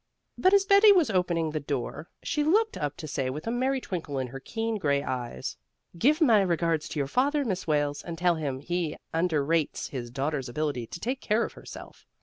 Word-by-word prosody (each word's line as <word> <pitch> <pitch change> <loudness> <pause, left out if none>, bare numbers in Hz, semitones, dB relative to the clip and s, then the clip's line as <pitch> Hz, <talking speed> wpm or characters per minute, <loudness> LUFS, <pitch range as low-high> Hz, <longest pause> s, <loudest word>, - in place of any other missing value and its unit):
But 375 +2 +4
as 395 -1 +4
Betty 400 +1 +7
was 350 - +4
opening 170 -4 +1
the 155 - -2
door, 145 +3 -4
she 300 - 0
looked 430 +9 +3
up 145 -1 -3
to 155 - -7
say 135 -3 -2
with 150 +4 -5
a 225 - -1
merry 260 +2 +1
twinkle 165 - -4
in 130 - -1
her 135 +2 -7
keen 225 +7 -3
gray 140 -5 +1
eyes, 120 - -4 0.4
"Give 285 - +3
my 235 - +5
regards 165 -4 0
to 150 - -4
your 140 - +1
father, 280 - +1
Miss 190 -5 -2
Wales, 145 -1 +1
and 170 -1 -7
tell 175 0 +3
him 140 -5 -3
he 170 0 -2 0.2
underrates 160 -2 0
his 120 -3 -5
daughter's 135 +1 -2
ability 140 -3 -2
to 170 - -8
take 255 +6 -3
care 220 +2 +2
of - - -8
herself." - - -12
165 Hz, 205 wpm, -28 LUFS, 145-235 Hz, 0.4 s, Betty